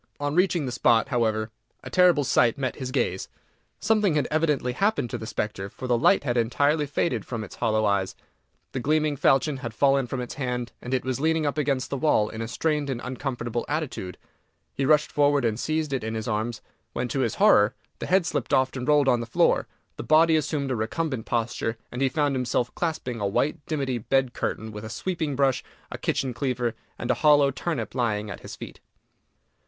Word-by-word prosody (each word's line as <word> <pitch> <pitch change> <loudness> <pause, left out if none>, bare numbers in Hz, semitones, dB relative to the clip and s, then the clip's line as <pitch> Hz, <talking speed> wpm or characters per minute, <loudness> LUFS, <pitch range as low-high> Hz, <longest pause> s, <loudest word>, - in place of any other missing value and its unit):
On 145 0 -1
reaching 180 -3 +2
the 125 - -3
spot, 120 +1 +3
however, 110 -4 0 0.3
a - - -8
terrible 180 -5 +5
sight 120 -3 +3
met 130 -2 -2
his 130 -2 -4
gaze. 120 -8 -1 0.5
Something 210 -6 +2
had 150 - +1
evidently 150 -5 +1
happened 195 - 0
to - - -2
the 110 - -6
spectre, 100 -3 -3
for 130 - -9
the 125 -1 +2
light 130 +10 +4
had 120 -3 -1
entirely 145 +6 +2
faded 135 - -1
from 115 -3 -5
its 100 - -10
hollow 110 -1 +1
eyes, 100 -2 0 0.6
the 130 - -3
gleaming 150 +2 +1
falchion 135 +2 +2
had 120 -4 -6
fallen 135 -1 +3
from 130 +2 -4
its 125 - -5
hand, 125 -3 -3
and 125 +2 -2
it 130 - -2
was 130 0 -2
leaning 160 +1 +1
up 145 - 0
against 140 -4 -1
the 140 - -1
wall 120 -7 +2
in 110 - -6
a 115 - -3
strained 150 +3 -1
and 130 -3 -2
uncomfortable 125 -2 -3
attitude. 145 - -3 0.6
He 135 - -1
rushed 150 0 +4
forward 145 -2 +3
and 110 0 0
seized 155 -1 -1
it 130 - -1
in 110 +1 -3
his 110 -1 -4
arms, 110 +1 -2 0.3
when, 120 +1 -2
to 135 - -2
his 130 - 0
horror, 135 - +5 0.2
the - - -4
head 185 -1 +3
slipped 175 - 0
off 130 0 +1
and 130 -1 -4
rolled 150 -2 +4
on 125 -2 +4
the 115 - -5
floor, 115 - +2 0.3
the - - -5
body 160 +1 +5
assumed 145 -3 -1
a - - +1
recumbent 120 +3 -2
posture, 115 -1 -1
and 125 - -5
he 135 - +3
found 145 +1 +1
himself 125 -1 -1
clasping 130 -9 -3
a 100 - +1
white 140 +8 0
dimity 135 -6 -1
bed 130 +2 +1
curtain, 110 0 -3
with 105 0 -8
a 110 - -6
sweeping 160 +3 -3
brush, 135 -1 +2 0.3
a - - -5
kitchen 130 -2 -1
cleaver, 125 -2 -1 0.2
and 120 - -1
a - - -2
hollow 145 -2 +5
turnip 140 -5 -3
lying 105 -4 -1
at - - -7
his - - -9
feet! - - -10
130 Hz, 210 wpm, -25 LUFS, 115-150 Hz, 0.6 s, terrible